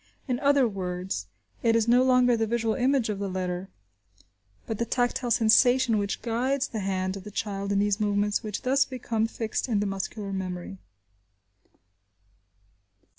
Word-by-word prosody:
In 250 -2 -1
other 280 -2 +4
words, 180 - -4 0.3
it 230 -1 +3
is 230 -1 +2
no 245 +2 +5
longer 250 -1 +4
the 225 -1 0
visual 225 -1 0
image 260 -1 +1
of 205 -2 -2
the 200 -1 -2
letter, 185 0 -3 1.0
but 220 - -4
the - - +2
tactile 245 +1 0
sensation, 240 0 +4
which 200 -1 -3
guides 255 +4 0
the 220 - -4
hand 190 -1 -2
of 190 - -9
the 210 - -8
child 200 -1 -3
in 200 - +1
these 205 +1 +1
movements, 205 0 +1
which 210 -2 -5
thus 270 +2 +3
become 230 -4 -2
fixed 225 +1 -3
in 215 -3 +2
the 205 - 0
muscular 195 +1 -4
memory. 185 0 -5
220 Hz, 160 wpm, -27 LUFS, 195-245 Hz, 1.0 s, no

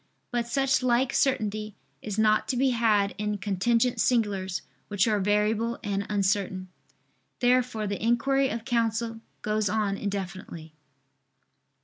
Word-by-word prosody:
But 240 -1 -1
such 270 +3 +1
like 250 +1 +2
certainty 215 -5 0 0.3
is 210 -1 -5
not 215 0 +3
to 255 - -1
be 265 +1 +3
had 215 -4 +2
in 210 0 -1
contingent 225 +5 +1
singulars, 200 -6 0 0.2
which 205 0 +1
are 210 -2 +2
variable 210 +3 +1
and 200 -2 -2
uncertain. 195 -2 0 0.7
Therefore 245 -3 +2
the 200 0 -3
inquiry 270 +4 +2
of 230 0 -5
counsel 230 -2 -1 0.2
goes 215 -1 0
on 205 -1 0
indefinitely. 190 -5 -5
215 Hz, 125 wpm, -27 LUFS, 200-240 Hz, 0.7 s, not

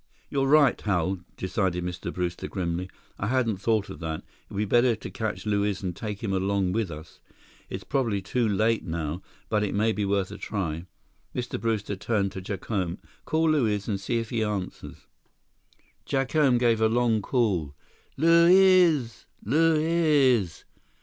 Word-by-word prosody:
"You're 135 -1 +1
right, 150 0 +4
Hal," 95 -2 0 0.2
decided 95 -2 -1
Mr. 90 0 -4
Brewster 90 -1 -3
grimly. 90 -1 -3 0.3
"I 100 - -1
hadn't 120 -4 +1
thought 110 +1 0
of - - -9
that. 80 -2 -4
It - - -35 0.2
would 100 - -7
be 105 - +1
better 120 +2 +3
to 110 - -8
catch 110 -1 -4
Luiz 100 -1 0
and 90 -2 -3
take 105 +1 -6
him 100 -3 -1
along 95 0 0
with 110 -1 -1
us. 80 0 -10 0.5
It's - - -6
probably 120 -7 0
too 115 +5 -1
late 110 +3 +1
now, 80 0 -4 0.3
but 105 -1 +1
it 105 -1 -1
may 110 +2 +2
be 105 0 -2
worth 100 -1 0
a - - -8
try." 85 -4 -3 0.5
Mr. 125 -5 -3
Brewster 110 -3 -1
turned 100 0 -1
to 95 - -7
Jacome. 95 -2 -3 0.3
"Call 160 0 +2
Luiz, 110 -9 +1
and 100 -3 -2
see 115 +5 -1
if 115 -1 -4
he 115 -2 0
answers." 105 -4 -5 1.0
Jacome 135 -1 +2
gave 115 -2 +2
a 110 - +4
long 115 -2 +2
call: 95 - 0 0.4
"Luiz! 170 - +5 0.2
Luiz!" 150 - +2
105 Hz, 160 wpm, -26 LUFS, 95-125 Hz, 1.0 s, Luiz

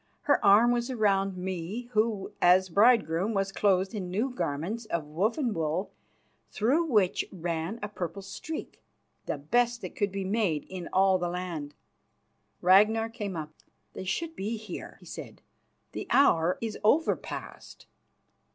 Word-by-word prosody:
Her 285 -4 +2
arm 210 +4 +6
was 240 +1 -1
round 195 -5 +1
me, 185 +4 -4
who, 215 -3 0
as 185 +1 +5
bridegroom, 205 -1 +3
was 195 0 0
clothed 195 -1 +1
in 190 -4 -4
new 220 +9 -1
garments 175 +3 -3
of 170 -7 -2
woven 215 - 0
wool 165 +3 -2 0.6
through 275 +11 +1
which 210 - +2
ran 170 +2 -3
a - - -1
purple 195 -1 -5
streak, 310 +10 -7 0.5
the - - -2
best 240 - +1
that - - -7
could 205 -2 0
be 195 0 -3
made 190 -7 0
in 185 -2 -7
all 190 0 +4
the 175 0 -1
land. 170 -5 -5 0.9
Ragnar 215 +5 +5
came 210 -5 -5
up. 155 -1 -5 0.4
"They - - -6
should 330 - -2
be 215 +4 -3
here," 210 -4 -8
he - - -15
said. - - -9 0.5
"The - - -6
hour 175 -11 +4
is 225 -2 -4
over 295 +10 +4
past." - - -9
195 Hz, 150 wpm, -28 LUFS, 180-225 Hz, 0.9 s, arm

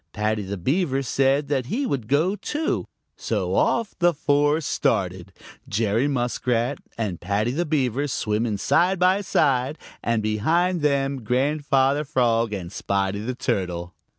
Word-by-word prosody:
Paddy 105 0 0
the 100 0 -5
Beaver 135 - 0
said 135 +3 +1
that 135 -4 0
he 265 - -1
would 130 - -2
go, 155 - +2
too, 300 +8 -2 0.3
so - - -2
off 230 -3 +1
the 175 -2 +3
four 145 +1 +2
started, 155 - -1 0.4
Jerry 110 +5 +1
Muskrat 125 -1 -1 0.2
and 105 -7 -3
Paddy 105 +5 0
the 170 +5 -1
Beaver 140 -2 0
swimming 110 -3 -1
side 180 - +2
by 185 +3 +3
side, 140 -6 +1 0.3
and 115 -2 0
behind 165 - +1
them 140 -3 0
Grandfather 135 +3 +1
Frog 120 -6 +1
and 90 -4 -5
Spotty 100 0 -1
the 120 +4 -4
Turtle. 90 -6 -2
130 Hz, 140 wpm, -24 LUFS, 110-150 Hz, 0.4 s, the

